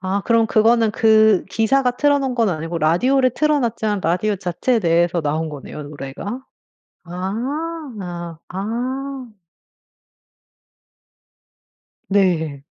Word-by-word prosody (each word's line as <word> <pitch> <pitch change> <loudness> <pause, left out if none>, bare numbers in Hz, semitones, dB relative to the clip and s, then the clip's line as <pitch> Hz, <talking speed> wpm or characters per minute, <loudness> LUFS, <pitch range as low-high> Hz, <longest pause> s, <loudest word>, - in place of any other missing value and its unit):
아 190 +2 -1
그럼 230 -1 +3
그거는 225 +1 +3
그 220 -2 +4
기사가 250 +5 +2
틀어 285 +2 +2
놓은 265 -2 -2
건 230 -3 +2
아니고 165 0 -3
라디오를 255 - +3
틀어 300 +4 +1
놨지만 215 -4 -1
라디오 185 +6 0
자체 195 +6 0
내에서 170 -1 +2
나온 155 +2 -1
거네요 150 +1 -8
노래가? 150 - -7 0.6
아 260 - -4 0.5
아. 255 +8 -4 2.8
네. 165 -8 +1
215 Hz, 215 characters per minute, -20 LUFS, 175-255 Hz, 2.8 s, 그